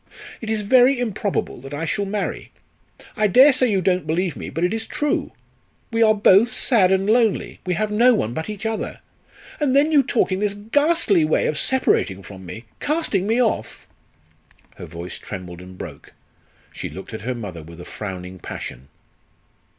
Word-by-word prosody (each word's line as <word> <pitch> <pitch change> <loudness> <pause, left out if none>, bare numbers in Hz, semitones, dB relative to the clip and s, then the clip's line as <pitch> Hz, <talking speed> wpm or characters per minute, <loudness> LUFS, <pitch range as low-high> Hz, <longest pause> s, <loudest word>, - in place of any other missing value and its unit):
It 220 - -5
is 220 -1 0
very 250 +5 +4
improbable 210 - -2
that 135 +2 -7
I 160 +3 -3
shall 200 +5 -1
marry. 200 0 -4 0.6
I 215 - +2
dare 260 +8 +7
say 255 -1 +2
you 195 -3 +1
don't 180 -3 +1
believe 170 +2 0
me, - - -6
but 165 - -3
it 180 - +1
is 225 0 -4
true. 295 0 -1 0.6
We 230 0 0
are 215 -1 +5
both 205 +3 +5
sad 205 -10 +3
and 190 +1 +2
lonely. 225 -1 +1
We 180 - +1
have 215 +3 -1
no 240 +3 +5
one 115 - -1
but 160 +9 -4
each 210 0 -6
other. 220 0 -3 0.6
And 280 -3 +1
then 295 +3 +4
you 295 -2 +6
talk 245 -5 0
in 185 - 0
this 205 -1 -1
ghastly 225 - +2
way 155 - +1
of 155 - 0
separating 125 - +1
from 95 -2 -11
me 115 +7 -8
casting 290 - 0
me 225 +3 +2
off." 235 -3 -1 0.9
Her - - -8
voice 85 +1 -7
trembled 90 -3 -8
and 90 0 -12
broke, - - -10 0.6
she - - -5
looked 95 +4 -10
at 110 - -6
her 125 +3 -3
mother 100 -8 -7
with 85 +2 -12
a 90 - -9
frowning 95 -3 -7
passion. 65 -4 -8
200 Hz, 185 wpm, -22 LUFS, -, 0.9 s, dare